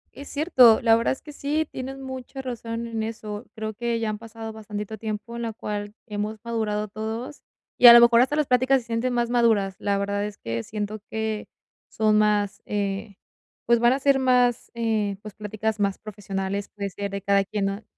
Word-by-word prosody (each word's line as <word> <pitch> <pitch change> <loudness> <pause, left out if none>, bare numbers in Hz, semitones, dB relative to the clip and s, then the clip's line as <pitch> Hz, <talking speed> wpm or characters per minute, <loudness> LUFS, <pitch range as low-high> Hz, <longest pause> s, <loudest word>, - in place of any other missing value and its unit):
Es 280 - -9
cierto, 260 -7 +5
la 225 -1 +6
verdad 230 - +1
es 265 - -8
que 300 - -10
sí, 295 +2 -1
tienes 265 +1 -6
mucha 265 0 -7
razón 235 -2 -5
en 225 -1 -3
eso, 215 0 -6
creo 220 -1 -5
que 235 0 -2
ya 225 - -1
han 210 - -4
pasado 225 0 -8
bastantito 210 0 -6
tiempo, 220 +2 -5
en 235 - -4
la 225 -1 -3
cual 205 -1 -5
hemos 210 0 -4
madurado 215 -2 -2
todos, 220 +6 -6 0.4
y 245 - +8
a 235 - +13
lo 235 - +10
mejor 235 0 +6
hasta 265 +4 +2
las 300 -2 +1
pláticas 255 +2 +3
se 235 - -17
sienten 230 +2 -1
más 240 -1 0
maduras. 220 -6 +2
La 200 -1 0
verdad 200 +1 -1
es 210 - -8
que 115 - -4
siento 210 0 -4
que 220 -1 -3 0.4
son 215 -1 +2
más, 210 -1 +1
eh, 200 0 -3 0.5
pues 235 0 +4
van 240 +2 +4
a 270 - 0
ser 275 0 +4
más, 250 -2 +2
eh, 220 -3 0
pues 215 -2 -9
pláticas 215 +1 -3
más 200 -1 0
profesionales, 200 -1 -4
puede 200 -1 -4
ser 200 +1 -5
de 200 - -4
cada 200 0 +3
quien 200 0 -2
no 195 +2 -4
220 Hz, 205 wpm, -25 LUFS, 205-240 Hz, 0.5 s, a